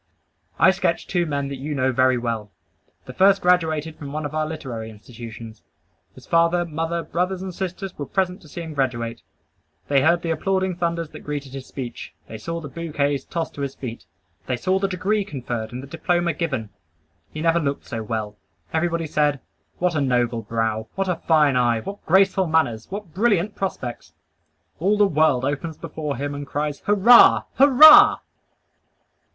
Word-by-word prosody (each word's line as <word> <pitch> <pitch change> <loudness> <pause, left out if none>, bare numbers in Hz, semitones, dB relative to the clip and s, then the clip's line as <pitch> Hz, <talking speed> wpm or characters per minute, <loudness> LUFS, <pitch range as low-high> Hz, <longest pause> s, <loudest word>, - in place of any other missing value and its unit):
I - - +6
sketch - - -1
two 175 -2 -1
men 140 -2 -2
that 140 - -5
you 145 +3 -4
know 130 -1 +1
very 130 0 +3
well. 115 -3 -3 0.6
The 125 - -9
first 195 +5 +4
graduated 160 -4 +1
from 140 -2 -7
one 155 +1 -4
of 145 - -5
our 155 0 -1
literary 125 -8 -6
institutions. 115 0 -11 0.5
His - - -15
father, 170 +1 +2
mother, 165 +1 -3
brothers 185 +2 -2
and 190 -1 -6
sisters 190 +1 -5
were 145 - -6
present 190 0 -1
to 160 - -16
see 170 +3 -7
him 160 -1 -7
graduate. 120 -4 -2 0.7
They 140 -1 +4
heard 170 +4 +3
the 165 - -1
applauding 190 +2 0
thunders 170 -2 -2
that - - -11
greeted 145 -2 -6
his 135 -1 -8
speech. 125 -4 -8
They 110 - -8
saw 165 +8 -4
the 155 - -8
bouquets 145 -2 -2
tossed 165 -1 -4
to 145 - -7
his 140 -1 -4
feet. 115 -6 -8 0.4
They 125 - -1
saw 185 +9 0
the 195 - 0
degree 195 +3 0
conferred 120 - -5
and 125 +2 -7
the - - -9
diploma 175 +3 0
given. 130 -10 -3 0.6
He 155 - -6
never 165 +1 +3
looked 140 -3 -3
so 115 - -5
well. 110 -1 -4 0.4
Everybody 165 0 0
said, 150 -2 +1 0.4
"What 180 0 0
a 155 - 0
noble 120 -3 0
brow! 110 0 -2
What 195 -1 -1
a 180 - 0
fine 150 -4 +4
eye! 120 -2 +2
What 200 - -8
graceful 190 +1 +3
manners! 140 -9 0
What 195 -4 -7
brilliant 205 -1 +1
prospects!" 130 -11 -5 0.7
All 200 +6 +2
the 205 - +5
world 155 -7 +2
opens 145 +3 -3
before 150 -3 -5
him 145 +2 -3
and 145 0 -6
cries, 145 0 -3
"Hurrah! 210 +4 +7 0.2
Hurrah!" 285 +3 +9
155 Hz, 180 wpm, -22 LUFS, 130-175 Hz, 0.7 s, Hurrah